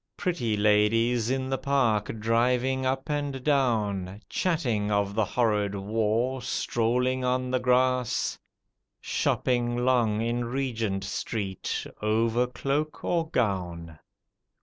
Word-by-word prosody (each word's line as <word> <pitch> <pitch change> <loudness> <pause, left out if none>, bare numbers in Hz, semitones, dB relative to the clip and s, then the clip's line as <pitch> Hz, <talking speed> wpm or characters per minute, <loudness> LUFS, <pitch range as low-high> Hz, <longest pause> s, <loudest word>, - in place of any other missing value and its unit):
Pretty 120 -12 -1
ladies 110 +3 +3
in 130 0 -1
the 135 - 0
park 120 -7 +1
driving 125 +4 +1
up 135 +2 -1
and 145 -3 -2
down, 105 -9 0
Chatting 125 - 0
of 100 -1 +1
the 110 +1 +2
horrid 105 -2 0
war, 110 +5 0
strolling 125 +3 0
on 125 0 0
the 130 - +2
grass, 125 -1 +1 0.6
Shopping 120 -1 0
long 120 -5 +2
in 120 +1 -1
Regent 115 -6 -2
Street, 100 0 -3 0.2
over 115 +3 +2
cloak 140 +5 -2
or 165 -2 0
gown. 90 - -2
120 Hz, 110 wpm, -27 LUFS, 105-130 Hz, 0.6 s, ladies